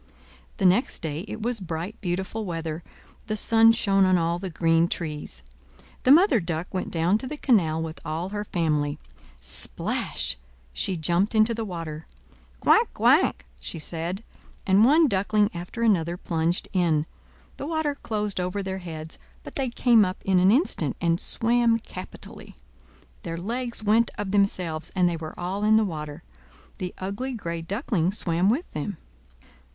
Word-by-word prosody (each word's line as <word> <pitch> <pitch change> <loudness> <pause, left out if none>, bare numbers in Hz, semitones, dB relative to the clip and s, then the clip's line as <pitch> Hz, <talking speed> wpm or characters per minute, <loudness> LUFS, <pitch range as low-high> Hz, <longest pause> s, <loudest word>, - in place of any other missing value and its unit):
The 195 - 0
next 190 +6 +2
day, 160 +3 -3
it 220 +1 -6
was 240 -1 0
bright, 175 +3 -5
beautiful 190 +4 -2
weather; 165 -3 -4 0.5
the 215 -1 -1
sun 225 +1 +6
shone 195 -4 +2
on 185 -1 +4
all 170 0 0
the 190 0 -4
green 165 0 +2
trees. 150 - -5 0.6
The 255 - +6
Mother 325 - +6
Duck 170 0 -4
went 185 - -2
down 175 +5 +2
to 260 - -4
the 300 +3 -5
canal 175 - +2
with 160 0 -6
all 165 +3 -3
her 205 +1 -3
family. 150 -6 0 0.4
Splash! - - -1 0.4
she 185 - -1
jumped 175 +7 +1
into 220 +2 +4
the 225 0 -3
water. 165 -5 -6 0.5
"Quack! - - +4
quack!" - - +3
she 60 - -4
said, 170 +5 -3 0.4
and 195 +2 +5
one 305 +6 +6
duckling 205 -1 +2
after 180 +7 -5
another 175 -6 +2
plunged 170 0 -1
in. 165 -5 +2 0.5
The 280 - -5
water 315 -2 0
closed 210 -7 -2
over 180 +3 -2
their 190 0 -4
heads, 160 -3 -7 0.2
but - - -10
they 270 -5 -1
came 235 -2 +4
up 185 -1 -3
in 190 -2 +4
an 185 +1 +5
instant, 215 - +1
and 170 0 +1
swam 235 0 +2
capitally; 230 - -10 0.7
their 165 -1 -5
legs 235 +5 -3
went 220 +2 +3
of 205 -2 -3
themselves, 185 -6 0
and 180 -2 +4
they 170 -1 -1
were 160 -1 -8
all 185 +3 -3
in 215 +1 +5
the 220 - +3
water. 155 -2 -6 0.6
The 180 -1 -3
ugly 200 +8 -4
gray 170 -7 -4
Duckling 190 - -1
swam 175 -1 +1
with 270 +11 +1
them. 155 +5 -4
185 Hz, 160 wpm, -25 LUFS, 165-220 Hz, 0.7 s, sun